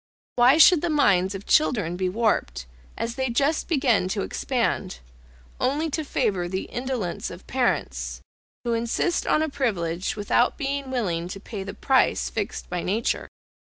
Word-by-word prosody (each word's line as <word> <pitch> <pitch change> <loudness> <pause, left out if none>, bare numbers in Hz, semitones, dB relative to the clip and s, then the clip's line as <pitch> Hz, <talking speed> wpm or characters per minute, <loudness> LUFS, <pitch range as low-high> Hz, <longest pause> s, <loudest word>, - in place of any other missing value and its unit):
Why 250 +4 +6
should 325 0 +7
the 345 - -1
minds 195 - +3
of 195 - -7
children 210 - +2
be 185 0 -1
warped 215 - 0 0.3
as 230 - -2
they 260 0 -2
just 280 +6 +1
begin 260 - +2
to 195 +1 -2
expand, 235 -7 -1 0.6
only 295 +5 0
to 315 - -1
favour 205 -11 -1
the 190 +1 -2
indolence 245 -8 -3
of - - -11
parents, - - -1 0.4
who 235 - 0
insist 235 +9 0
on 310 - +3
a - - 0
privilege 185 -11 -1
without 215 +4 +1
being 280 -1 -3
willing 180 -10 -1
to 190 +2 -7
pay 205 0 -7
the 195 +1 -6
price 265 -2 +2
fixed 210 -3 -4
by 180 -1 -3
nature? 215 +7 -1
230 Hz, 155 wpm, -25 LUFS, 185-270 Hz, 0.6 s, should